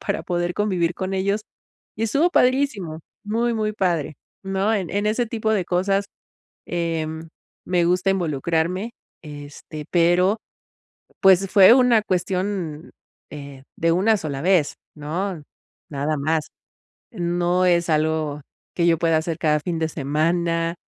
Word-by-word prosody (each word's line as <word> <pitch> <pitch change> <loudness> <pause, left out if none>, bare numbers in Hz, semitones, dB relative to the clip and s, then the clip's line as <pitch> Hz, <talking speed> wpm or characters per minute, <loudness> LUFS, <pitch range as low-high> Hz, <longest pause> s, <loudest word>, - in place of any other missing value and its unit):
para - - -1
poder 175 0 -1
convivir 185 -5 0
con 190 +2 -4
ellos, 200 +2 0 0.5
y 220 - -1
estuvo 285 +10 +2
padrísimo, 250 - +1 0.2
muy, 230 +3 0
muy 215 -1 -1
padre, 170 -7 -1 0.3
¿no?, 195 +2 0
en 190 -5 -2
en 205 +2 -1
ese 230 +3 +1
tipo 220 -1 -2
de 200 -4 +1
cosas, 195 +3 +1 0.6
em, 165 -2 -3 0.4
me 180 -1 +2
gusta 180 +2 +1
involucrarme, 170 - -1 0.3
este, 150 0 -9
pero 180 +4 +3 0.8
pues, 190 -1 +5
fue 195 +1 +8
una 250 -4 +4
cuestión, 180 -4 -2 0.4
eh, 140 -2 -9 0.2
de 165 0 +2
una 210 +5 +3
sola 145 -7 -4
vez, 175 -3 +2 0.2
¿no?, 160 +3 -4 0.5
nada 145 +2 -1
más, 155 +2 0 0.7
no 175 -1 0
es 170 -1 +2
algo 155 -1 0 0.3
que 170 - +1
yo 165 -1 +3
pueda 165 -1 +2
hacer 165 0 -3
cada 150 -1 +2
fin 170 +2 -3
de 160 - 0
semana. 165 +3 0
175 Hz, 135 wpm, -22 LUFS, 160-195 Hz, 0.8 s, fue